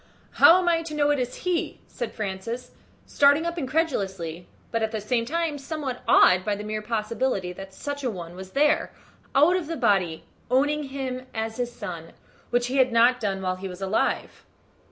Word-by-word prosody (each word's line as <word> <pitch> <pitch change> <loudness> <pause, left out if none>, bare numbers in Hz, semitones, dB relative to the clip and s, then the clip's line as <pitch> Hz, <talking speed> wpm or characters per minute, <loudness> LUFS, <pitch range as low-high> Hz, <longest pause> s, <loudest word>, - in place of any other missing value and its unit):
"How 340 - +7
am 365 -1 0
I 335 -1 +3
to 325 -2 -6
know 290 -1 +3
it 290 - +1
is 250 0 -2
he?" 360 -2 -1
said 240 - -5
Francis, 215 +4 -5 0.3
starting 285 +3 +4
up 340 0 -2
incredulously, 195 - -2 0.2
but 230 - 0
at 220 - +1
the 220 -1 -3
same 230 +3 0
time 325 0 -1
somewhat 275 -3 -4
awed 185 0 +6
by 210 0 0
the 205 - -6
mere 215 0 -3
possibility 215 -3 -1
that 195 +1 -9
such 285 +8 -5
a 255 - +1
one 175 -5 -7
was 190 0 -10
there, 295 +1 +2 0.4
out 305 +6 +6
of 360 -4 -2
the 330 0 -4
body, 175 -5 +1 0.3
owning 290 +4 +2
him 260 -2 -5
as 220 +1 -3
his 245 -1 -2
son, 165 -7 -7 0.4
which 245 0 +1
he 255 +3 -2
had 260 -2 +4
not 240 +2 +4
done 195 -4 -2
while 185 0 -1
he 195 +1 -6
was 180 -1 -8
alive. 195 +2 -1
240 Hz, 195 wpm, -25 LUFS, 195-285 Hz, 0.4 s, How